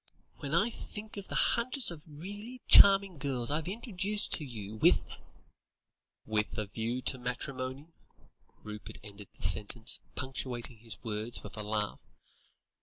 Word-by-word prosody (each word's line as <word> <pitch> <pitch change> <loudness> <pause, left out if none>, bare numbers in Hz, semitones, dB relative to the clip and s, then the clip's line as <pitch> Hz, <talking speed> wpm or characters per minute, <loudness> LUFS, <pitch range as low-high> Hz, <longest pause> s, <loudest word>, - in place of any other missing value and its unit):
When 145 +2 -2
I 215 +7 +3
think 215 -1 -7
of 200 - -7
the - - -5
hundreds 255 -1 +2
of 165 -3 -8
really 205 +11 -8
charming 195 -4 +8
girls 130 -3 -1
I've 155 +2 -1
introduced 205 -1 0
you 110 -6 -7
to, - - -17
with - - +3 0.5
" - - -60
"With 105 - 0
a 110 - -1
view 115 +5 -3
to 130 0 +2
matrimony," 130 +2 -4 0.8
Rupert 105 0 -8
ended 105 -1 -10
the - - -12
sentence, 110 +5 +2 0.2
punctuating 125 -3 -3
his 115 -1 -4
words 110 +1 -3
with 105 -1 -8
a 110 - -5
laugh. 105 0 -2
130 Hz, 145 wpm, -32 LUFS, -, 0.8 s, charming